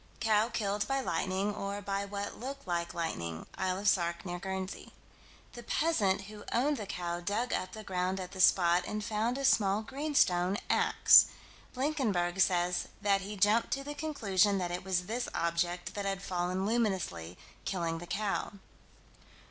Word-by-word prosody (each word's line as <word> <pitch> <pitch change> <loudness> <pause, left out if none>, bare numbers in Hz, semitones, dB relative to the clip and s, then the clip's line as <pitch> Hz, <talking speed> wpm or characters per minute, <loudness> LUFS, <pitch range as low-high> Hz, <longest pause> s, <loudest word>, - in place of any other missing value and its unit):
Cow 220 0 +3
killed 205 -2 -1
by 270 0 0
lightning, 190 -2 -1
or 200 0 -4
by 200 0 -2
what 200 0 -5
looked 275 +3 -6
like 170 -1 -2
lightning 85 - -3
(Isle 185 -1 -1
of 205 +1 -3
Sark, 170 -2 +1
near 175 -1 -4
Guernsey). 190 +1 -5 0.6
The 240 - -8
peasant 225 -11 +1
who 205 +1 -10
owned 280 +5 +2
the 210 -3 -6
cow 175 -1 -3
dug 205 +7 -1
up 185 - -2
the 215 -1 -7
ground 185 -1 -1
at 185 -1 -6
the 190 -1 -3
spot 175 -1 +5
and 210 0 -3
found 225 +3 0
a 275 - -2
small 205 -4 +3
greenstone 215 -9 +1
"ax." - - +7 0.5
Blinkenberg 220 - 0
says 175 -1 +2
that 200 -1 +2
he 205 +2 -6
jumped 210 +4 +3
to 275 - -2
the 290 +1 -5
conclusion 210 -11 +1
that 180 -2 -2
it 175 +1 -4
was 180 -1 0
this 240 +5 -3
object 175 +1 -1
that 200 -1 -4
had 195 0 -2
fallen 180 +1 -1
luminously, 190 - -1 0.3
killing 165 -3 -2
the 175 - -9
cow. 205 +2 -2
195 Hz, 165 wpm, -31 LUFS, 180-215 Hz, 0.6 s, ax